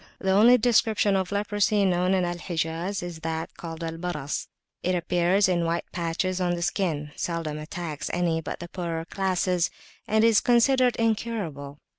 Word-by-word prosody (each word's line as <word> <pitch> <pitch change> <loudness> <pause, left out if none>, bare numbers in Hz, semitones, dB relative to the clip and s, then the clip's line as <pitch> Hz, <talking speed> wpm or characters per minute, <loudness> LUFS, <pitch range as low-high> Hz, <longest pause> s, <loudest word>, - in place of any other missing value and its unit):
The 190 - 0
only 225 +6 +7
description 220 -3 +3
of 190 -1 -1
leprosy 205 0 +1
known 180 0 +2
in 185 -1 +1
Al 175 0 -3
Hijaz 170 +3 -2
is 175 -2 -6
that 160 0 -4
called 165 -1 -7
"Al 165 0 -4
Baras": 150 -5 -3 0.3
it 180 0 0
appears 175 +3 +2
in 175 -2 +1
white 170 +1 -1
patches 180 +2 -2
on 175 -1 +1
the 170 - -3
skin, 155 -6 -1
seldom 165 -3 -3
attacks 155 -1 -5
any 170 -2 0
but - - -6
the 175 - -7
poorer 170 -2 -4
classes, 185 -1 0 0.4
and 220 +1 +3
is 225 -2 +6
considered 250 +1 +4
incurable. 205 -11 -2
180 Hz, 165 wpm, -26 LUFS, 165-200 Hz, 0.4 s, only